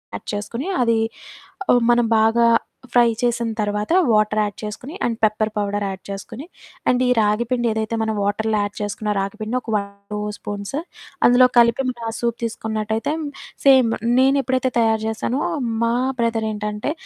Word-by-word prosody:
add - - -9
చేసుకొని, 230 - -4
అది 230 -1 +2 0.7
ఒ - - +6 0.2
మనం 240 0 +3
బాగా 225 +2 +4 0.5
ఫ్రై 240 -1 +5
చేసిన 240 -1 0
తర్వాత, 210 +2 -1 0.2
వాటర్ 215 0 +2
యాడ్ 205 -1 -2
చేసుకొని, 215 +8 -7
అండ్ 235 -1 0
పెప్పర్ 215 0 +2
పౌడర్ 205 0 -1
యాడ్ 190 -1 -6
చేసుకొని, 225 +7 -7 0.4
అండ్ 250 0 +2
ఈ - - +2
రాగిపిండి 235 +3 +1
ఏదైతే 220 +1 -2
మనం 220 - -1
వాటర్‌లో 215 +2 0
యాడ్ 205 0 -5
చేసుకున్న 205 +1 -3
రాగిపిండిని 215 +4 -3
ఒక 225 - -6
1, 200 -1 0 0.3
2 210 - -2 0.2
స్పూన్స్ 205 +4 -6 0.5
అందులో 245 +1 +7
కలిపి, 235 +2 +5
మనం 240 -2 -6
ఆ - - -3
సూప్ 235 -1 -1
తీసుకున్నట్టయితే, 220 +3 -2 0.5
సేమ్ 260 -4 +6 0.3
నేను 270 +2 +4
ఎప్పుడైతే 260 0 0
తయారు 225 -1 +2
జేశానో, 230 +5 -2 0.4
మా 230 0 +2 0.3
బ్రదర్ 230 -1 0
ఏంటంటే, 210 +4 -3
220 Hz, 155 wpm, -21 LUFS, 210-240 Hz, 0.7 s, అందులో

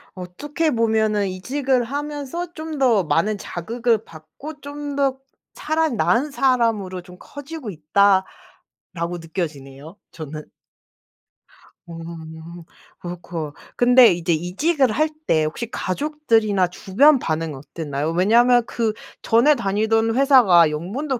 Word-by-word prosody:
어떻게 285 - -3
보면은 220 -3 +1
'이직을 255 +7 -1
하면서 295 +5 -5
좀 315 -1 -7
더 235 -7 +3
많은 190 +6 0
자극을 230 +6 -2
받고 165 - -11
좀 290 0 -6
더 275 -2 +1 0.4
차라리 315 -1 0
나은 225 - +1
사람으로 230 -9 0
좀 180 0 -15
커지고 285 -3 -9
있다.'라고 175 0 -1
느껴지네요 155 -1 -7
저는. 155 -1 -8 1.5
음. 165 0 -9 0.4
어이코. 175 -3 -6 0.2
근데 245 0 +6
이제 175 0 -2
이직을 250 - 0
할 310 +7 +1 0.2
때 155 -1 +3
혹시 220 +9 -5
가족들이나 225 -5 0
주변 240 - +3
반응 160 -5 -3
어땠나요? 145 +1 -4
왜냐하면 235 +8 +4
그 230 -2 -1 0.3
전에 240 +7 +4
다니던 225 +1 0
회사가 240 - +6
연봉도 230 - -3
215 Hz, 260 characters per minute, -21 LUFS, 170-270 Hz, 1.5 s, 근데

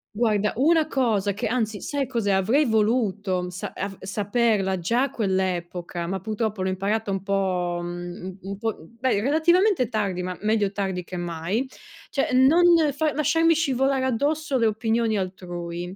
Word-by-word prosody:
Guarda, 210 -2 +1
una 315 +4 +3
cosa 220 -8 +1
che 205 - -4
anzi, 220 -2 -1
sai 280 -3 -2
cos'è? 230 -6 -1
Avrei 220 +11 +3
voluto 210 -5 0
sa 180 - -6
av 195 -1 -4
saperla 205 -1 0
già 235 +9 +1
a 275 - 0
quell'epoca, 180 -4 -2
ma 190 +1 -2
purtroppo 215 -1 -2
l'ho 190 - 0
imparata 200 +3 -1
un 195 -1 -2
po', 185 -3 -1
mhmm, 175 0 -6
un 185 +1 -7
un 195 +1 -6
po' 225 0 -2
beh, 230 -3 -1
relativamente 330 - +3
tardi, 195 -6 -1
ma 180 0 -4
meglio 210 -2 +1
tardi 190 -3 -3
che 180 +1 -7
mai. 175 +8 -2 0.4
Cioè 275 - -1
non 270 +7 +5 0.3
fa 305 0 0
lasciarmi 325 +3 +3
scivolare 270 -4 +1
addosso 285 +3 0
le 230 - +2
opinioni 220 0 +1
altrui. 175 -1 -5
210 Hz, 160 wpm, -24 LUFS, 185-255 Hz, 0.4 s, non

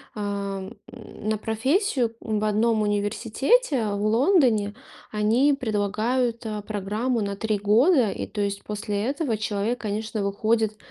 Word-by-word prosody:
ам, 200 0 -4 0.2
на 215 +1 -4
профессию 240 - 0
в 215 -2 -2
одном 215 +1 +2
университете 225 - +1
в 200 0 -2
Лондоне. 230 - +3 0.4
Они 225 +7 +3
предлагают, 230 +1 -1
а, 215 -1 -3
программу 215 +4 -2
на 200 -1 -2
3 215 +1 -1
года. 230 - +4
И, - - -4
то 210 - -4
есть, 200 0 -2
после 210 -1 -3
этого 275 -3 -1
человек, 215 +3 -1
конечно, 215 0 -3
выходит 215 +2 0
215 Hz, 125 wpm, -25 LUFS, 205-240 Hz, 0.4 s, года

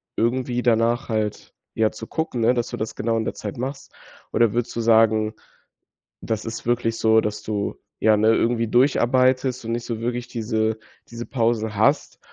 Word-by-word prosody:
irgendwie 125 +1 0
danach 120 +1 +2
halt, 110 -2 -3 0.2
ja, 110 -1 +2
zu 110 - -9
gucken, 160 -7 -3
ne, 115 +2 +4
dass 120 -1 -1
du - - -5
das 110 - -4
genau 115 0 0
in 110 - -1
der - - -2
Zeit 105 0 -6
machst? 135 +3 -5 0.4
Oder 115 -3 +3
würdest 120 0 -2
du - - -2
sagen, 110 -1 +3 0.9
das 110 -1 -3
ist 115 0 -6
wirklich 115 -1 0
so, 110 0 +4
dass 105 0 -3
du, 105 -2 -3 0.2
ja, 110 -1 +4
ne, 110 +1 +3
irgendwie 115 -1 +1
durcharbeitest 130 0 +2
und 115 - -3
nicht 120 0 -3
so 115 -2 -4
wirklich 120 +1 -3
diese 110 -1 -1 0.3
diese 120 0 -7
Pausen 115 -3 0
hast 110 +8 +1
115 Hz, 180 wpm, -23 LUFS, 110-120 Hz, 0.9 s, ne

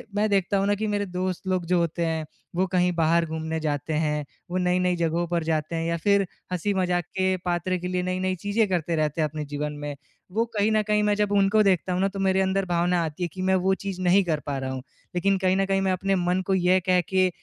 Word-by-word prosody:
मैं 215 +1 +2
देखता 200 0 +2
हूँ 195 0 +1
न 205 - +3
कि 215 +1 -2
मेरे 205 -1 0
दोस्त 185 0 -3
लोग 185 -2 0
जो 180 +1 +3
होते 170 0 0
हैं 160 -1 -1 0.3
वो 185 +2 +2
कहीं 180 0 +2
बाहर 165 +1 +3
घूमने 160 0 -3
जाते 150 0 -2
हैं। 150 -1 0 0.3
वो 180 - 0
नई-नई 180 0 +2
जगहों 170 0 0
पर 170 -1 -1
जाते 155 0 -1
हैं 165 0 -1
या 170 - 0
फ़िर 200 -1 +4 0.3
हँसी-मजाक 180 -1 0
के 190 0 +2
पात्र 180 +1 0
के 180 0 -5
लिए 180 0 -1
नई-नई 185 +1 -1
चीज़ें 205 +4 0
करते 170 -2 0
रहते 155 0 0
हैं 155 - +2
अपने 150 +1 -5
जीवन 145 +1 -4
में। 145 -1 -4 0.4
वो 225 +4 +1
कहीं 205 +2 +3
न 215 0 +3
कहीं 210 0 +2
मैं 210 - +3
जब 205 -1 0
उनको 200 +2 +4
देखता 185 -2 +2
हूँ 180 - 0
न - - +3
तो 195 - -7
मेरे 190 0 +2
अंदर 190 0 +1
भावना 175 0 +1
आती 160 +2 -4
है - - +1
कि 185 - -6
मैं 190 0 +2
वो 190 +1 +2
चीज़ 195 -2 -4
नहीं 185 +2 +4
कर 160 -4 -1
पा 140 -1 -2
रहा 130 0 -3
हूँ। 130 -1 -4 0.3
लेकिन 195 +2 +2
कहीं 185 0 +2
न 195 - +2
कहीं 195 0 +1
मैं 190 - +1
अपने 195 +1 0
मन 180 +1 +1
को 195 - +2
ये 185 0 +3
कह 180 0 +5
के 185 -1 +3
180 Hz, 255 wpm, -25 LUFS, 165-195 Hz, 0.4 s, कह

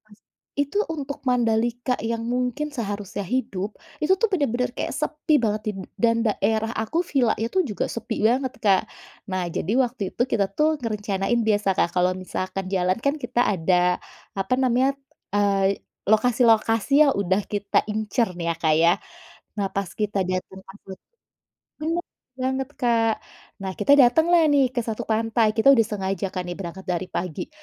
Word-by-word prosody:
Pas 215 -1 -21 0.4
itu 285 +8 0
untuk 285 -3 -5
Mandalika 240 +1 +1
yang 230 +1 -2
mungkin 250 +5 -2
seharusnya 205 -6 -4
hidup, 210 -4 -2 0.2
itu 365 +5 +4
tuh 455 +3 +1
bener-bener 250 -8 0
kayak - - -4
sepi 305 0 +1
banget 210 0 0
dim 195 - -9 0.2
dan 230 -1 +4
daerah 220 +2 0
aku 240 +11 -1
villa 255 -8 +2
itu 235 +12 0
juga 210 - -2
sepi 230 -2 -3
banget, 260 +1 0
Kak. 195 -2 +5 0.5
Nah 185 -1 -1
jadi 190 - -2
waktu 245 -3 0
itu - - +2
kita 200 -2 +2
tuh 310 0 +2
ngerencanain 210 -1 -1
biasa, 205 -3 +1
Kak, 170 - +1
kalau 180 +1 +3
misalkan 185 +1 -4
jalan 185 0 +1
kan 280 - +2
kita 245 0 -1
ada, 180 -1 +2 0.4
apa 195 +6 +1
namanya, 260 +1 +2 0.4
eee, 200 -1 +2 0.3
lokasi-lokasi 225 +1 +3
yang 275 - +3
udah 195 0 +1
kita 205 -1 0
incer 215 0 0
nih 170 -1 -4
ya, - - -7
Kak, 155 -2 +3
ya. 170 +1 +6 0.7
Nah 195 -1 0
pas 195 0 -1
kita 210 -2 -2
diantar 185 +1 -4
angkut 190 -1 -12 0.8
bener 330 +3 -1 0.3
banger, 265 +1 -2
Kak, 230 -3 +2 0.5
nah 190 - -3
kita 280 - +2
dateng 270 +7 +5
lah 335 -2 +6
nih 275 -3 +4
ke-1 225 -3 -2
pantai, 225 0 +1
kita 250 +5 +6
udah 255 - +5
sengaja 195 -1 -2
kan 180 - -2
nih 175 - -5
berangkat 190 +1 -7
dari 180 0 -2
pagi, 175 -3 -4
220 Hz, 160 wpm, -24 LUFS, 195-250 Hz, 0.8 s, ya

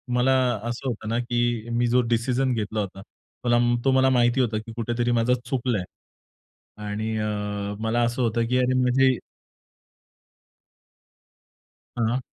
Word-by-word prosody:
मला 130 +2 +3 0.3
असं 120 +3 -4
होतं 110 -3 -4
ना, 115 - 0
की 120 -1 -1
मी 120 +1 +1
जो 125 +1 +3
डिसिजन 125 +2 +1
घेतला 110 -1 -2
होता. 95 -1 -4
तो 120 +3 -1
तो 135 - +4
मला 130 0 +4
माहिती 120 0 +3
होता 110 -3 0
की 110 +1 -7
कुठेतरी 120 +1 -1
माझं 120 +1 +2
चुकलंय. 120 -6 -1 1.0
आणि 110 +2 -3
अ, 105 - -1 0.5
मला 115 +2 0
असं 120 +2 -2
होतं 115 0 +1
की 125 +1 +1
अरे 125 0 +2
म्हणजे 130 0 +3 2.8
हां. 120 +2 +1
120 Hz, 135 wpm, -24 LUFS, 115-125 Hz, 2.8 s, तो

